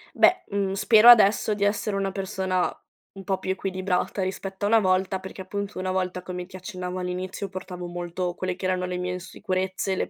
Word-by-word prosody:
Beh, 370 Hz, -, +5 dB
mhmm, 200 Hz, -1 st, -1 dB
spero, 220 Hz, +3 st, +5 dB
adesso, 215 Hz, -2 st, +7 dB
di 205 Hz, -1 st, -2 dB
essere 205 Hz, 0 st, 0 dB
una 195 Hz, 0 st, -1 dB
persona 190 Hz, -1 st, -1 dB, 0.4 s
un 195 Hz, -, -10 dB
po' 190 Hz, 0 st, -1 dB
più 190 Hz, -, -2 dB
equilibrata 190 Hz, 0 st, -1 dB
rispetto 190 Hz, +1 st, -3 dB
a -, -, +3 dB
una 225 Hz, +2 st, +5 dB
volta, 185 Hz, 0 st, +1 dB
perché, 190 Hz, +1 st, -8 dB
appunto, 200 Hz, +1 st, -5 dB
una 185 Hz, 0 st, -1 dB
volta, 185 Hz, -1 st, -1 dB
come 180 Hz, 0 st, -6 dB
ti 190 Hz, +1 st, -10 dB
accennavo 185 Hz, -1 st, -5 dB
all'inizio, 185 Hz, +2 st, -4 dB
portavo 185 Hz, -1 st, -7 dB
molto 175 Hz, +1 st, -3 dB
quelle 185 Hz, -1 st, -2 dB
che 185 Hz, -, -5 dB
erano 185 Hz, -1 st, 0 dB
le 180 Hz, 0 st, -3 dB
mie 180 Hz, 0 st, -2 dB
insicurezze, 185 Hz, +1 st, -2 dB
le -, -, -2 dB
190 Hz, 195 wpm, -25 LUFS, 185-195 Hz, 0.4 s, adesso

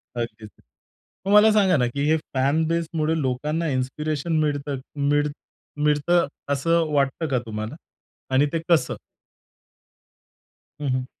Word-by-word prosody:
अगदीच. 115 Hz, -2 st, -5 dB, 0.8 s
मग 200 Hz, -, +1 dB
मला 210 Hz, +1 st, +7 dB
सांगा 195 Hz, -5 st, +4 dB
ना, 125 Hz, -2 st, +2 dB
की 140 Hz, +4 st, -3 dB
हे 160 Hz, -, +4 dB, 0.2 s
फॅन 140 Hz, +4 st, +2 dB
बेसमुडे 160 Hz, -1 st, 0 dB
लोकांना 150 Hz, +5 st, -1 dB
इन्स्पिरेशन 150 Hz, +4 st, -1 dB
मिळत 145 Hz, -2 st, -1 dB, 0.4 s
मिळ 145 Hz, 0 st, +3 dB, 0.6 s
मिळतं 150 Hz, +3 st, +3 dB, 0.3 s
असं 165 Hz, +4 st, +2 dB
वाटतं 140 Hz, +3 st, +1 dB
का 130 Hz, -3 st, +1 dB
तुम्हाला? 110 Hz, +3 st, -5 dB, 0.6 s
आणि 135 Hz, +2 st, +5 dB
ते 165 Hz, -, +1 dB
कसं? 170 Hz, -2 st, +3 dB, 1.9 s
हं, 145 Hz, -, -1 dB
हं. 130 Hz, 0 st, 0 dB
150 Hz, 125 wpm, -24 LUFS, 130-165 Hz, 1.9 s, मला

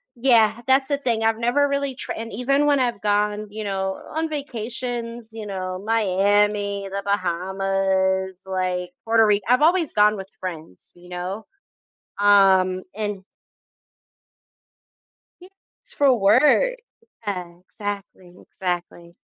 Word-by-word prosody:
yeah, 235 Hz, -2 st, +3 dB
that's 265 Hz, +1 st, +3 dB
the 285 Hz, -, +1 dB
thing. 230 Hz, -4 st, -1 dB
I've 225 Hz, 0 st, +1 dB
never 245 Hz, +5 st, +2 dB
really 280 Hz, -2 st, -2 dB
tried -, -, -5 dB
and 225 Hz, 0 st, -6 dB
even 275 Hz, +6 st, +1 dB
when 285 Hz, -2 st, +3 dB
I've 240 Hz, -6 st, -1 dB
gone, 210 Hz, 0 st, 0 dB
you 215 Hz, +1 st, -6 dB
know, 190 Hz, -1 st, -2 dB, 0.2 s
on 320 Hz, 0 st, -1 dB
vacations, 240 Hz, -4 st, -5 dB
you 220 Hz, -2 st, -7 dB
know, 185 Hz, -1 st, -4 dB
Miami, 205 Hz, -1 st, +1 dB
The 200 Hz, 0 st, -3 dB
Bahamas, 190 Hz, 0 st, 0 dB
like, 180 Hz, -1 st, -2 dB
Puerto 225 Hz, 0 st, +4 dB
Rico. 205 Hz, -1 st, +2 dB
I've 255 Hz, +4 st, +4 dB
always 340 Hz, -1 st, +3 dB
gone 210 Hz, 0 st, +4 dB
with 190 Hz, 0 st, -7 dB
friends, 160 Hz, -, -8 dB
you 175 Hz, 0 st, -16 dB
know, 180 Hz, +4 st, -5 dB, 0.7 s
um, 190 Hz, -2 st, +4 dB
and 205 Hz, -3 st, -4 dB, 2.6 s
It's -, -, -11 dB
for 275 Hz, -3 st, +4 dB
work. 260 Hz, -, +4 dB, 0.5 s
Yeah. 180 Hz, -4 st, -4 dB
Exactly. 195 Hz, -2 st, -7 dB
Exactly. 175 Hz, -2 st, -5 dB
205 Hz, 125 wpm, -23 LUFS, 190-235 Hz, 2.6 s, Puerto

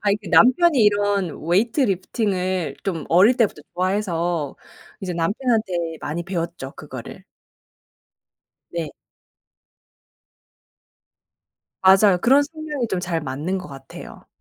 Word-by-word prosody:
아이 205 Hz, 0 st, +2 dB
그 205 Hz, -4 st, -11 dB
남편이 290 Hz, -, +5 dB
이런 205 Hz, -3 st, +2 dB, 0.2 s
weight 225 Hz, -, +2 dB
lifting을 185 Hz, -4 st, -1 dB
좀 165 Hz, -6 st, -3 dB
어릴 200 Hz, +9 st, +5 dB
때부터 210 Hz, -, 0 dB
좋아해서 175 Hz, -5 st, -1 dB, 0.4 s
이제 185 Hz, -2 st, -4 dB
남편한테 215 Hz, +4 st, 0 dB, 0.3 s
많이 165 Hz, +4 st, -4 dB
배웠죠 170 Hz, -7 st, -4 dB
그거를. -, -, -9 dB, 1.5 s
네. 165 Hz, -2 st, -3 dB, 2.9 s
맞아요. 190 Hz, 0 st, +6 dB
그런 270 Hz, +7 st, +5 dB
성향이 300 Hz, -4 st, -4 dB
좀 185 Hz, -, -2 dB
잘 170 Hz, -2 st, -2 dB
맞는 150 Hz, +7 st, -3 dB
것 180 Hz, -4 st, -9 dB
같아요. 135 Hz, -1 st, -11 dB
190 Hz, 260 characters per minute, -22 LUFS, 170-215 Hz, 2.9 s, 맞아요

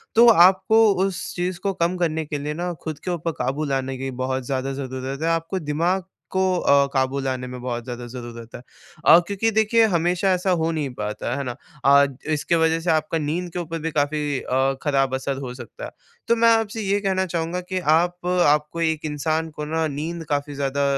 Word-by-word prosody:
तो 235 Hz, +2 st, +7 dB
आपको 195 Hz, +3 st, +6 dB, 0.2 s
उस 195 Hz, -3 st, -3 dB
चीज़ 180 Hz, 0 st, -2 dB
को 195 Hz, 0 st, -1 dB
कम 175 Hz, +1 st, 0 dB
करने 160 Hz, -2 st, -1 dB
के 150 Hz, 0 st, -4 dB
लिए 150 Hz, +1 st, -3 dB
ना, 175 Hz, +3 st, -3 dB
खुद 155 Hz, -2 st, -5 dB
के 180 Hz, -, -2 dB
ऊपर 165 Hz, -1 st, -2 dB
क़ाबू 145 Hz, +3 st, -1 dB
लाने 135 Hz, -2 st, -2 dB
की 135 Hz, 0 st, -4 dB
बहुत 130 Hz, -1 st, -2 dB
ज़्यादा 135 Hz, +1 st, -2 dB
ज़रूरत 135 Hz, +1 st, -5 dB
है। 165 Hz, -, +1 dB
आपको 165 Hz, +3 st, -1 dB
दिमाग़ 170 Hz, +5 st, 0 dB, 0.3 s
को 190 Hz, -, +2 dB
अ, 140 Hz, -3 st, +4 dB
क़ाबू 135 Hz, 0 st, +1 dB
लाने 130 Hz, -1 st, -3 dB
में 125 Hz, 0 st, -7 dB
बहुत 120 Hz, -2 st, -3 dB
ज़्यादा 120 Hz, 0 st, -6 dB
ज़रूरत 120 Hz, -1 st, -9 dB
है। -, -, -8 dB, 0.4 s
अ, 165 Hz, +2 st, +9 dB
क्योंकि 205 Hz, +3 st, 0 dB
देखिए 220 Hz, +1 st, +3 dB
हमेशा 180 Hz, +1 st, +1 dB
ऐसा 180 Hz, +1 st, -1 dB
हो 165 Hz, +1 st, +1 dB
नहीं 150 Hz, -4 st, -2 dB
पाता 105 Hz, +2 st, -3 dB
है 140 Hz, -, -2 dB
ना। 125 Hz, -2 st, -4 dB, 0.3 s
अ, 140 Hz, 0 st, +7 dB, 0.3 s
इस 150 Hz, -, -1 dB
की 170 Hz, -, +1 dB
वज़ह 165 Hz, 0 st, +2 dB
से 165 Hz, +1 st, -3 dB
आपका 155 Hz, +1 st, 0 dB
नींद 165 Hz, +4 st, -2 dB
के 180 Hz, -, -3 dB
ऊपर 165 Hz, -1 st, -4 dB
भी 165 Hz, +1 st, -3 dB
काफ़ी 145 Hz, -1 st, 0 dB
अ, 135 Hz, +1 st, +1 dB
ख़राब 135 Hz, -3 st, +1 dB
असर 135 Hz, +1 st, -3 dB
हो 130 Hz, -3 st, -6 dB
सकता 135 Hz, -, -9 dB
है। -, -, -8 dB, 0.4 s
तो 235 Hz, -, +4 dB
मैं 230 Hz, 0 st, +4 dB
आपसे 225 Hz, 0 st, -3 dB
ये 200 Hz, 0 st, +1 dB
कहना 190 Hz, -1 st, 0 dB
चाहूँगा 170 Hz, 0 st, -2 dB
कि 185 Hz, +1 st, -3 dB
आप 175 Hz, +2 st, +1 dB
आपको 165 Hz, -2 st, +2 dB
एक 160 Hz, -1 st, 0 dB
इंसान 155 Hz, +2 st, -1 dB
को 150 Hz, 0 st, -6 dB
ना 160 Hz, +1 st, 0 dB
नींद 160 Hz, +4 st, -4 dB
काफ़ी 145 Hz, 0 st, -1 dB
ज़्यादा 140 Hz, 0 st, -1 dB
155 Hz, 210 wpm, -23 LUFS, 135-180 Hz, 0.4 s, अ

